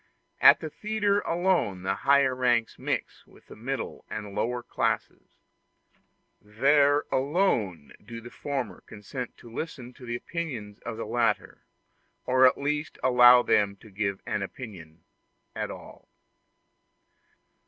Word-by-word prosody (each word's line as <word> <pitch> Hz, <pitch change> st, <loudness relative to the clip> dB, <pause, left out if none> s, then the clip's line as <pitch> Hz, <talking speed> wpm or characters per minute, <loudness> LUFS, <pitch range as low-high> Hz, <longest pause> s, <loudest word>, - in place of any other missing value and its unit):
At -, -, +8 dB
the 155 Hz, -, -4 dB
theatre 210 Hz, 0 st, 0 dB
alone 170 Hz, -, 0 dB
the 95 Hz, +1 st, 0 dB
higher 140 Hz, +1 st, +3 dB
ranks 120 Hz, -3 st, +1 dB
mix -, -, -3 dB
with -, -, -20 dB
the -, -, -13 dB
middle 130 Hz, +5 st, -5 dB
and 105 Hz, -1 st, -5 dB
the -, -, -9 dB
lower 120 Hz, +4 st, -2 dB
classes; -, -, -2 dB, 1.1 s
there 140 Hz, +7 st, +3 dB
alone 130 Hz, -, 0 dB
do 115 Hz, +2 st, -8 dB
the 120 Hz, +1 st, -11 dB
former 140 Hz, -3 st, -4 dB
consent 120 Hz, +5 st, -7 dB
to 115 Hz, -1 st, -14 dB
listen 125 Hz, -4 st, -6 dB
to 125 Hz, 0 st, -13 dB
the 120 Hz, -, -2 dB
opinion 125 Hz, -8 st, -5 dB
of 115 Hz, -2 st, -4 dB
the 115 Hz, -, -4 dB
latter, 115 Hz, -1 st, -1 dB, 0.6 s
or 130 Hz, +1 st, +6 dB
at 130 Hz, -, +2 dB
least 150 Hz, +2 st, -2 dB
to -, -, -7 dB
allow 125 Hz, 0 st, +8 dB
them 100 Hz, -1 st, +2 dB
to 105 Hz, +1 st, -17 dB
give 100 Hz, 0 st, -2 dB
an 105 Hz, -, -2 dB
opinion 90 Hz, -7 st, -9 dB, 0.5 s
at -, -, -3 dB
all. -, -, -11 dB
125 Hz, 140 wpm, -27 LUFS, 105-140 Hz, 1.1 s, At